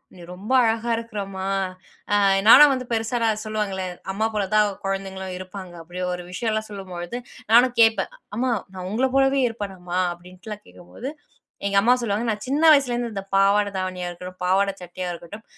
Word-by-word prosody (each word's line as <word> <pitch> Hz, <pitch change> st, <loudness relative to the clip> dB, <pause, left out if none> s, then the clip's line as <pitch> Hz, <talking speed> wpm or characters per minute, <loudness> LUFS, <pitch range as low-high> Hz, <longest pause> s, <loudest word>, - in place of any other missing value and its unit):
நீ -, -, -15 dB
ரொம்ப 200 Hz, +7 st, -8 dB
அழகா 230 Hz, +1 st, 0 dB
இருக்குற 230 Hz, -2 st, -6 dB
அம்மா." 190 Hz, -1 st, -6 dB, 0.7 s
அ -, -, +5 dB, 0.3 s
நானும் 285 Hz, +5 st, +10 dB
வந்து 255 Hz, -1 st, -3 dB
பெருசானா, 225 Hz, 0 st, 0 dB, 0.2 s
சொல்லுவாங்கல்ல, 205 Hz, -3 st, -2 dB, 0.3 s
அம்மா 210 Hz, +3 st, -1 dB
போல 210 Hz, -2 st, 0 dB
தான் 210 Hz, -1 st, +5 dB, 0.2 s
குழந்தைங்களும் 190 Hz, -1 st, -4 dB
இருப்பாங்க, 185 Hz, -1 st, -9 dB
அப்படி 180 Hz, +2 st, -7 dB
ஒரு 180 Hz, 0 st, -5 dB
விஷயம்லாம் 215 Hz, +2 st, -2 dB
சொல்லும்பொழுது, 190 Hz, +1 st, -6 dB, 0.3 s
நானும் 245 Hz, +1 st, +6 dB
கேட்பேன், 225 Hz, -, +3 dB, 0.2 s
"அம்மா 250 Hz, +2 st, 0 dB, 0.2 s
நான் 185 Hz, -1 st, -6 dB
உங்கள 250 Hz, +5 st, +2 dB
போலவே 270 Hz, 0 st, +4 dB
இருப்பேனா, 205 Hz, -4 st, -6 dB
அம்மா?" 180 Hz, 0 st, -4 dB
அப்பிடீன்ட்டுலாம் 185 Hz, +4 st, -10 dB
கேட்கும்போது, 235 Hz, +9 st, -9 dB, 0.6 s
எங்க 200 Hz, -, 0 dB
அம்மா 245 Hz, +3 st, +5 dB
சொல்லுவாங்க. 220 Hz, -1 st, -1 dB
நான் 210 Hz, -1 st, -2 dB
சின்ன 285 Hz, +5 st, 0 dB
வயசுலேருந்து 245 Hz, -5 st, +2 dB
இந்த 195 Hz, -1 st, -4 dB
பாவாடை 200 Hz, +1 st, +4 dB
தாவணியா 185 Hz, -1 st, -3 dB
இருக்கட்டும், 180 Hz, +1 st, -9 dB
பாவாட 195 Hz, +2 st, +3 dB
சட்டையா 180 Hz, +1 st, -5 dB
இருக்கட்டும், 175 Hz, +6 st, -9 dB
205 Hz, 160 wpm, -23 LUFS, 185-230 Hz, 0.7 s, நானும்